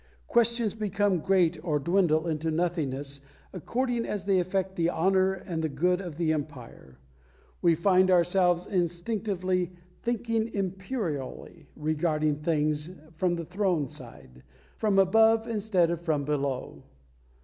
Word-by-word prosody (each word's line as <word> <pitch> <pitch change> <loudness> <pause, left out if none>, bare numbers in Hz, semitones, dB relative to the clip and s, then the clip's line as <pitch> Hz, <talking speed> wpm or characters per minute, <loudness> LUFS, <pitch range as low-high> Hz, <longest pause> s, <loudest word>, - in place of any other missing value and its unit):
Questions 235 -2 +2
become 205 -3 0
great 175 -3 +2
or 155 -4 +1
dwindle 170 +1 +2
into 160 0 -1
nothingness 145 -5 -2 0.3
according 240 +6 -1
as 200 -3 -4
they 195 -2 +3
affect 190 +1 -1
the 170 -1 +1
honour 190 +3 +2
and 180 -3 -5
the 160 - -1
good 180 +6 +1
of 175 -5 -7
the 165 -2 +1
Empire. 130 - -7 0.6
We 170 -2 +4
find 185 +2 +3
ourselves 180 0 +3
instinctively 185 0 -1 0.3
"thinking 230 -1 -1
Imperially," 185 - -4
regarding 155 -1 0
things 150 0 0 0.2
from 175 +2 0
the 170 -1 -5
Throne 180 -4 0
side 65 - -10 0.3
from 210 -3 +1
above 220 +4 +4
instead 200 -6 +1
of 170 -1 -3
from 155 -4 -1
below. 140 -3 -2
175 Hz, 125 wpm, -28 LUFS, 155-195 Hz, 0.6 s, We